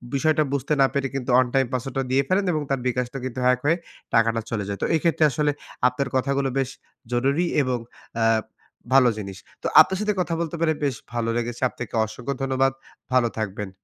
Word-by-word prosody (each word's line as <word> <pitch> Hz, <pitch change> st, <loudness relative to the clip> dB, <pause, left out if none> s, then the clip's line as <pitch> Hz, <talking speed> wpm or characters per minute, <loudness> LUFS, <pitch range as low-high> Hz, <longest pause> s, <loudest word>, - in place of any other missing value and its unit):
বিষয়টা 155 Hz, +2 st, +3 dB
বুঝতে 140 Hz, +2 st, 0 dB
না -, -, +7 dB
পেরে 140 Hz, -1 st, 0 dB
কিন্তু 135 Hz, -1 st, -3 dB
1 130 Hz, 0 st, +5 dB
টাইম 135 Hz, -1 st, +3 dB
পাসওয়ার্ড 130 Hz, +1 st, -3 dB
টা -, -, +1 dB
দিয়ে 135 Hz, +1 st, +3 dB
ফেলেন 190 Hz, +2 st, +2 dB
এবং 155 Hz, -, 0 dB
তার 135 Hz, -1 st, 0 dB
bKash 125 Hz, -1 st, 0 dB
টা -, -, -4 dB
কিন্তু 130 Hz, 0 st, -4 dB
হ্যাক 125 Hz, 0 st, +4 dB
হয়ে 165 Hz, +3 st, +3 dB, 0.4 s
টাকাটা 115 Hz, 0 st, +3 dB
চলে 105 Hz, -3 st, -1 dB
যায়। 100 Hz, -, -4 dB
তো -, -, +1 dB
এইক্ষেত্রে 160 Hz, 0 st, +2 dB
আসলে 150 Hz, 0 st, +1 dB, 0.4 s
আপনার 125 Hz, +2 st, -2 dB
কথাগুলো 135 Hz, +1 st, +1 dB
বেশ 135 Hz, -2 st, 0 dB, 0.4 s
জরুরি 135 Hz, +8 st, +1 dB, 0.2 s
এবং 130 Hz, -2 st, 0 dB, 0.4 s
অ্যা 115 Hz, -1 st, +2 dB, 0.7 s
ভালো 130 Hz, -2 st, +7 dB
জিনিস। 100 Hz, -2 st, -6 dB, 0.3 s
তো -, -, 0 dB
আপনার 190 Hz, -, +2 dB
সাথে 210 Hz, 0 st, +1 dB
কথা 175 Hz, -, -2 dB
বলতে 170 Hz, 0 st, -3 dB
পেরে 160 Hz, -1 st, +3 dB
বেশ 140 Hz, -4 st, +1 dB, 0.2 s
ভালো 115 Hz, -1 st, -1 dB
লেগেছে। 120 Hz, 0 st, -3 dB
আপনাকে -, -, -7 dB
অসংখ্য 120 Hz, +5 st, -5 dB
ধন্যবাদ। 135 Hz, 0 st, +2 dB, 0.4 s
ভালো 125 Hz, -2 st, +4 dB
থাকবেন। 105 Hz, -2 st, -3 dB
130 Hz, 200 wpm, -24 LUFS, 120-140 Hz, 0.7 s, না